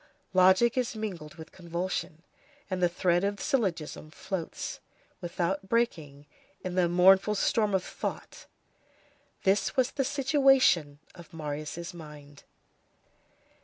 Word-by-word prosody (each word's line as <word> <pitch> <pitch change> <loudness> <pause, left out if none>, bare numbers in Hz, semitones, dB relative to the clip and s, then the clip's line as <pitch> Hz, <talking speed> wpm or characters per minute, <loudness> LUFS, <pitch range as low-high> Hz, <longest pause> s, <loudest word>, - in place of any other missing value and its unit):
Logic 190 +5 +5
is 245 -2 -2
mingled 185 -8 -6
with 160 -1 -11
convulsion, 170 -2 -4 0.5
and 185 -1 -2
the 175 - +4
thread 175 +1 +1
of 200 +1 0
the - - -8
syllogism 190 - -2
floats, 170 +1 -5 0.4
without 180 +2 -2
breaking, 155 -12 -1 0.4
in 185 - -4
the 180 -1 +2
mournful 190 +4 +5
storm 210 0 +1
of 185 - 0
thought. - - -6 1.0
This 195 +2 +1
was 260 -1 +2
the 275 - -1
situation 270 - +3 0.2
of 175 -1 -14
Marius' 155 +3 -5
mind. 150 -3 -12
180 Hz, 120 wpm, -28 LUFS, 165-210 Hz, 1.0 s, Logic